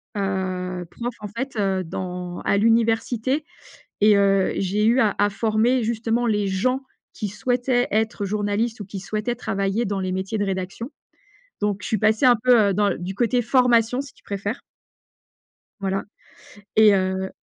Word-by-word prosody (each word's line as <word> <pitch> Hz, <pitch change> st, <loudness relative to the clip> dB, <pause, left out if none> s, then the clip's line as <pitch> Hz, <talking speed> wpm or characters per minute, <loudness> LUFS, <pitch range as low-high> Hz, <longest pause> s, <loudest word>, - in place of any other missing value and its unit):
heu, 185 Hz, -2 st, -2 dB
prof 240 Hz, 0 st, -5 dB
en 210 Hz, -, -5 dB
fait, 250 Hz, +5 st, -5 dB
heu, 195 Hz, -2 st, 0 dB
dans 180 Hz, 0 st, -5 dB
à 200 Hz, -, +1 dB
l'université, 230 Hz, +5 st, +1 dB, 0.6 s
et 210 Hz, 0 st, +6 dB
heu, 195 Hz, -1 st, +3 dB
j'ai 205 Hz, +3 st, 0 dB
eu 245 Hz, +4 st, +4 dB
à 210 Hz, -3 st, +2 dB
à 205 Hz, -, +4 dB
former, 225 Hz, +4 st, +1 dB
justement, 230 Hz, +1 st, 0 dB
les 210 Hz, -3 st, +1 dB
gens 250 Hz, +8 st, 0 dB, 0.3 s
qui 210 Hz, -, -4 dB
souhaitaient 245 Hz, +4 st, 0 dB
être 220 Hz, 0 st, 0 dB
journalistes 210 Hz, +3 st, -1 dB
ou 200 Hz, -, -6 dB
qui 195 Hz, -1 st, -7 dB
souhaitaient 215 Hz, +4 st, -2 dB
travailler 195 Hz, +1 st, -1 dB
dans 195 Hz, -1 st, -2 dB
les 185 Hz, 0 st, -2 dB
métiers 190 Hz, +4 st, -3 dB
de 205 Hz, -, +1 dB
rédaction, 190 Hz, +4 st, -4 dB, 0.7 s
donc 205 Hz, -1 st, -1 dB
je -, -, -5 dB
suis 220 Hz, -, 0 dB
passée 215 Hz, +5 st, +3 dB
un 245 Hz, -, +7 dB
peu, 240 Hz, -5 st, +5 dB
heu, 195 Hz, -, 0 dB
dans 205 Hz, -1 st, +2 dB
du 185 Hz, +2 st, -6 dB
côté 240 Hz, +2 st, +1 dB
formation, 245 Hz, -1 st, +3 dB
si 280 Hz, -2 st, -11 dB
tu -, -, -25 dB
préfères. 200 Hz, +4 st, -4 dB, 1.2 s
Voilà 195 Hz, 0 st, -1 dB, 0.7 s
et 215 Hz, -1 st, +7 dB
heu 190 Hz, 0 st, -1 dB
210 Hz, 165 wpm, -23 LUFS, 195-235 Hz, 1.2 s, un